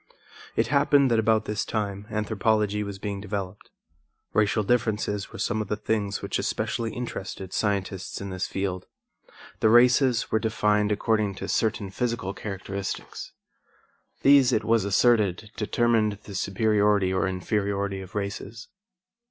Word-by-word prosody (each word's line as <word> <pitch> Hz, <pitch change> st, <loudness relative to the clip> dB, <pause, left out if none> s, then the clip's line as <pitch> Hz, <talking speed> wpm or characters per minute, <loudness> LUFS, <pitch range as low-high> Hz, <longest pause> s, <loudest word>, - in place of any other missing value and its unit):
It -, -, +1 dB
happened 140 Hz, -2 st, +4 dB
that 115 Hz, -, +3 dB
about 110 Hz, 0 st, +2 dB
this 105 Hz, -2 st, -2 dB
time 105 Hz, -2 st, -3 dB
anthropology 105 Hz, -1 st, 0 dB
was 100 Hz, -1 st, -5 dB
being 100 Hz, 0 st, -4 dB
developed. 100 Hz, -1 st, -5 dB, 0.6 s
Racial 110 Hz, 0 st, +2 dB
differences 105 Hz, -2 st, 0 dB
were -, -, -9 dB
some 110 Hz, -2 st, -1 dB
of 105 Hz, -, -4 dB
the 105 Hz, -, -1 dB
things 105 Hz, -2 st, -2 dB
which -, -, -1 dB
especially 115 Hz, -2 st, -2 dB
interested 100 Hz, -5 st, -6 dB
scientists 100 Hz, -2 st, -2 dB
in 100 Hz, -1 st, -6 dB
this 95 Hz, 0 st, -3 dB
field. 95 Hz, -2 st, -3 dB, 0.7 s
The 110 Hz, -, +4 dB
races 120 Hz, +1 st, +4 dB
were 110 Hz, -, +3 dB
defined 105 Hz, -1 st, +1 dB
according 105 Hz, -1 st, +1 dB
to -, -, -6 dB
certain 105 Hz, -3 st, 0 dB
physical 115 Hz, -3 st, -2 dB
characteristics. 100 Hz, -1 st, -6 dB, 0.9 s
These, 135 Hz, -2 st, +6 dB
it 110 Hz, -3 st, +1 dB
was 115 Hz, -2 st, +2 dB
asserted, 105 Hz, -1 st, +2 dB
determined 110 Hz, -1 st, +1 dB
the 100 Hz, -, -10 dB
superiority 100 Hz, 0 st, +2 dB
or 95 Hz, -, +1 dB
inferiority 100 Hz, +1 st, -1 dB
of 95 Hz, +1 st, -12 dB
races. 105 Hz, +2 st, -5 dB
105 Hz, 135 wpm, -26 LUFS, 100-110 Hz, 0.9 s, These